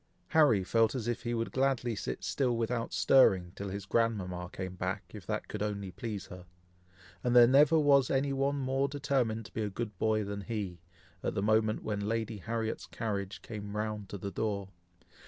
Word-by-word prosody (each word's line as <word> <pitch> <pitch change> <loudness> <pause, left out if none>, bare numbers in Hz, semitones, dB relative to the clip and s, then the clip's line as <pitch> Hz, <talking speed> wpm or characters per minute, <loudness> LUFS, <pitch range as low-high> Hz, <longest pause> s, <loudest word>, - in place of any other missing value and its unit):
Harry 145 -12 +5
felt 115 +5 +2
as 120 -3 -3
if 120 0 -1
he 120 0 -2
would 115 0 -2
gladly 130 -3 +1
sit - - -4
still 125 -4 0
without 115 0 -1
stirring, 95 -10 +4
till 100 0 -5
his 100 0 -5
grandmama 95 -6 0
came 95 -1 -5
back, 95 +2 -3
if 105 -5 -10
that 105 -1 -2
could 105 - -5
only 100 -2 -2
please 105 0 -5
her; 90 -1 -11 0.8
and 125 0 +1
there 120 -1 +10
never 145 +6 +6
was 140 -4 +5
any 135 +1 +1
one 135 +1 +1
more 135 0 0
determined 130 -6 -1
to 95 - -13
be 110 - -2
a 105 - -1
good 105 +1 -5
boy 110 -1 +2
than 100 0 -4
he, 100 -5 -4 0.4
at - - -2
the 100 - 0
moment 110 0 +2
when 105 -2 -2
Lady 115 -1 -2
Harriet's 110 +3 -3
carriage 100 -3 -4
came 105 -2 -6
round 105 -2 -3
to 100 - -5
the 100 +1 -5
door. 100 0 -2
110 Hz, 195 wpm, -31 LUFS, 100-120 Hz, 0.8 s, there